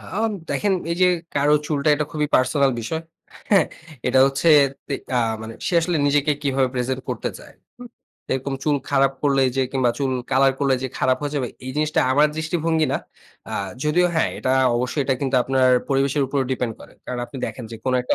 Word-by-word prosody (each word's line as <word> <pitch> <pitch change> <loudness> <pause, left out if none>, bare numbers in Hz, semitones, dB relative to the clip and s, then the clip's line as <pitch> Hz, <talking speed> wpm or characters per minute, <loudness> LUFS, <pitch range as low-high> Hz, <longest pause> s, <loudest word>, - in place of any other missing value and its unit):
আ - - -15 0.5
দেখেন 205 -1 +1 0.2
এই 170 - -1
যে, 185 - +7 0.3
কারো 145 +1 +3
চুলটা 145 -1 0
এটা 150 +1 -1
খুবই 150 -1 0
পার্সোনাল 135 +1 +3
বিষয়। 160 +8 -4 0.5
হ্যাঁ, 200 -2 +5 0.4
এটা - - +3
হচ্ছে 140 +5 +1 0.4
তে 140 - -2 0.2
আ - - +4 0.2
মানে 110 0 -7
সে - - -1
আসলে 170 +1 0
নিজেকে 145 +1 +2
কিভাবে 135 -2 +1
প্রেজেন্ট 130 +1 -1
করতে 125 - -2
চায়, - - -14 0.3
হু? - - -10 0.5
এরকম 135 +1 -2
চুল 150 -2 +2
খারাপ 135 -1 +3
করলে 140 -2 +3 0.2
যে, - - +2
কিংবা 130 -3 +2
চুল 135 -2 0 0.2
কলার 135 +1 +4
করলে 140 -2 +2
যে, - - -1
খারাপ 130 0 +2
হয়ে 145 -1 -3
যাবে। 130 -4 -1 0.2
এই 130 - -4
জিনিসটা 155 0 +1
আমার 150 +3 +5
দৃষ্টিভঙ্গি 160 0 0
না। - - +1 0.5
আ - - -5 0.3
যদিও 175 +4 +3
হ্যাঁ, 160 - +2
এটা 130 - -1 0.3
অবশ্যই 125 +4 -1
এটা 135 - +1
কিন্তু 135 -1 -1
আপনার 130 0 +2 0.2
পরিবেশের 140 +1 +1
উপর 140 +2 -2
ডিপেন্ড 125 -3 -2
করে। - - -14
কারণ 125 - -5
আপনি 120 - -11
দেখেন 125 - -7
যে, 115 - -7
কোন 130 - 0
একটা 125 - 0
140 Hz, 200 wpm, -22 LUFS, 130-150 Hz, 0.5 s, যে